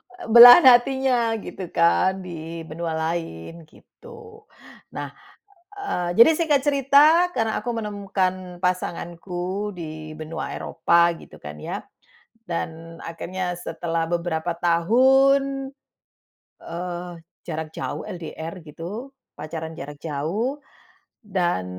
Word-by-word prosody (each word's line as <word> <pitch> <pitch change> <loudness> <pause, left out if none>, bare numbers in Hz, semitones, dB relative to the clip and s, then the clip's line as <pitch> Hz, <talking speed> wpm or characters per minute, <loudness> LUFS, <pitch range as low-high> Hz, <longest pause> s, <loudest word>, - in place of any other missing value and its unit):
Eee, 360 - -10
belahan 245 +7 +11
hatinya, 245 -2 +2
gitu 185 -2 -7
kan, 185 +3 +2
di 165 -1 -7
benua 160 +1 -5
lain, 160 - -5
gitu. 450 - -16 0.5
Nah, - - -5 0.6
eee, 400 - -3
jadi 235 +7 +9
singkat 300 -5 +2
cerita, 290 +5 +4
karena 225 -2 -1
aku 245 - -4
menemukan 190 -4 -3
pasanganku 180 +2 -3
di 155 -2 -8
benua 155 +1 -6
Eropa, 170 +1 +2
gitu - - -15
kan, 75 0 -9
ya. - - -5 0.6
Dan, 165 -2 -6
akhirnya, 180 +2 -5
setelah 165 -1 -3
beberapa 170 0 -2
tahun, 270 +10 +3 0.9
eee, 175 +1 -6 0.4
jarak 160 -1 -5
jauh, - - -5
LDR, 165 0 -7
gitu, 195 - -8 0.2
pacaran 160 +2 -6
jarak 145 +1 -8
jauh, 175 - -2 0.6
dan 175 - -1
180 Hz, 105 wpm, -23 LUFS, 165-240 Hz, 0.9 s, belahan